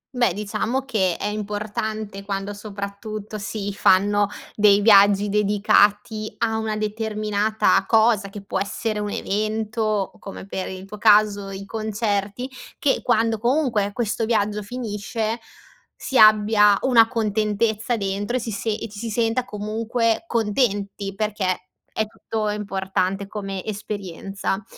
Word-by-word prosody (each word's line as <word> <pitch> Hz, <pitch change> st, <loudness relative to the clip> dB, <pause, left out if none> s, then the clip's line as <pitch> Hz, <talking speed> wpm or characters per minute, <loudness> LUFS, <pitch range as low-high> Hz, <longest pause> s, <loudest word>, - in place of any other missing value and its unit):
Beh, 245 Hz, -4 st, +3 dB
diciamo 210 Hz, +6 st, -2 dB
che 190 Hz, -9 st, 0 dB
è -, -, -4 dB
importante 210 Hz, 0 st, -4 dB
quando, 195 Hz, 0 st, -3 dB
soprattutto 205 Hz, +1 st, -6 dB
si 205 Hz, -1 st, -4 dB
fanno 205 Hz, +1 st, +3 dB, 0.3 s
dei 205 Hz, -1 st, +5 dB
viaggi 205 Hz, -1 st, +6 dB
dedicati 210 Hz, +1 st, +2 dB
a 225 Hz, -1 st, 0 dB
una 220 Hz, -1 st, -2 dB
determinata 215 Hz, 0 st, +1 dB
cosa, 220 Hz, -3 st, +3 dB
che 195 Hz, 0 st, -9 dB
può 200 Hz, -, -2 dB
essere 210 Hz, +2 st, -2 dB
un 210 Hz, 0 st, -2 dB
evento 215 Hz, +2 st, -2 dB
o, 210 Hz, -3 st, -1 dB
come 195 Hz, -1 st, -8 dB
per 190 Hz, -1 st, -4 dB
il 190 Hz, 0 st, -7 dB
tuo 210 Hz, +1 st, -10 dB
caso 210 Hz, -2 st, +4 dB
i 195 Hz, 0 st, -7 dB
concerti, 215 Hz, +1 st, -2 dB, 0.3 s
che 280 Hz, -, +1 dB
quando, 225 Hz, -2 st, +1 dB
comunque, 240 Hz, -4 st, +1 dB
questo 225 Hz, 0 st, -1 dB
viaggio 210 Hz, -2 st, 0 dB
finisce, 225 Hz, 0 st, -3 dB, 0.6 s
si 265 Hz, -, -1 dB
abbia 210 Hz, -1 st, +6 dB
una 235 Hz, -4 st, +5 dB
contentezza 220 Hz, 0 st, 0 dB
dentro 200 Hz, +4 st, -2 dB
e -, -, -1 dB
si 225 Hz, -1 st, -4 dB
se 200 Hz, +2 st, -3 dB
e 220 Hz, +1 st, -2 dB
ci 205 Hz, 0 st, -10 dB
si 230 Hz, -, -4 dB
senta, 230 Hz, +3 st, +1 dB
comunque 225 Hz, +3 st, -1 dB
contenti, 205 Hz, -, -1 dB
perché 195 Hz, -3 st, -2 dB, 0.2 s
è 220 Hz, -, -1 dB
tutto 215 Hz, 0 st, -4 dB
importante 195 Hz, -1 st, -2 dB
come 195 Hz, -2 st, -5 dB
esperienza. 200 Hz, -1 st, -4 dB
210 Hz, 135 wpm, -23 LUFS, 200-220 Hz, 0.6 s, viaggi